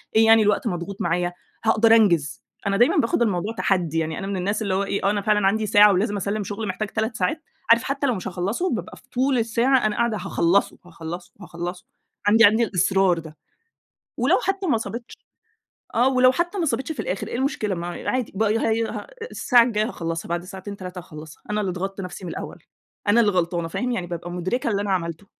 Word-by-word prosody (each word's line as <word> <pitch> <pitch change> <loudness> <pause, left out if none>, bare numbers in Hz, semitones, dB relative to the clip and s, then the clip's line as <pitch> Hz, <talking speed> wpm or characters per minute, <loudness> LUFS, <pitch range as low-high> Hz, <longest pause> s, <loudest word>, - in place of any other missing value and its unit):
إيه 220 0 +6
يعني 225 0 +7
الوقت 210 +3 +1
مضغوط 185 0 -4
معايا، 175 +1 0 0.3
هاقدر 225 0 +5
أنجز، 170 -10 +2 0.3
أنا 200 0 +1
دايمًا 240 +3 +4
باخد 230 +1 +1
الموضوع 210 -1 0
تحدّي 180 -7 0
يعني 160 -1 -3
أنا 195 - -5
من 200 -1 -2
الناس 200 +4 -1
اللي 200 -3 -1
هو 195 +1 +1
إيه، 200 0 -2
آه - - +4
أنا 205 -1 -1
فعلًا 210 -1 +2
عندي 215 +2 +1
ساعة 210 -1 +6
ولازم 205 +2 0
أسلِّم 205 +2 -2
شغل 210 +2 -5
محتاج 185 +3 -3
3 220 +2 -2
ساعات، 215 - -1 0.3
عارف 230 +1 +6
حتّى 275 +1 -1
لو 250 - +1
مش 185 - -5
هاخلصه، 195 - -2
بابقى - - -7
في - - -21
طول 260 +1 +1
الساعة 235 +2 +2
أنا 210 -1 +1
قاعدة 235 -1 +1
هاخلصه، 195 0 +1
هاخلصه، 170 0 -8
هاخلصه، 175 0 -6 0.4
عندي 220 +2 +6
عندي 220 +3 +4
الإصرار 190 -3 +2
ده. 160 -1 -11 0.8
ولو - - +3
حتّى 390 -1 -1
ما 260 - +3
صابتش 235 +1 -7 0.8
آه 245 +3 +4
ولو 255 -1 +5
حتّى 345 +8 -2
ما 345 - 0
صابتش 270 0 -1
في 310 - -7
الآخر 190 - -3
إيه - - -5
المشكلة 240 -6 -1
ما 170 0 -5 0.2
عادي 255 -3 -1
بي 220 +3 +1
هي 225 0 +1
ه - - -6 0.2
الساعة 245 -2 +4
الجايّة 215 -2 0
هاخلصها، 165 -8 -4
بعد 175 0 -2
ساعتين 190 +2 -8
3 180 -1 -7
هاخلصها، 155 -3 -12
أنا 210 0 0
اللي 195 -3 -1
ضغطت 195 +2 -4
نفسي 180 0 -7
من 170 - -5
الأوّل، - - -8 0.4
أنا 220 +3 +5
اللي 210 -3 +3
غلطانة 175 -2 -1
فاهم، 250 +9 -2
يعني 185 -7 -2
بابقى 175 0 -6
مدركة 185 +8 -2
اللي 200 -1 0
أنا 205 -1 -2
عملته. 170 0 -2
205 Hz, 210 wpm, -23 LUFS, 180-230 Hz, 0.8 s, يعني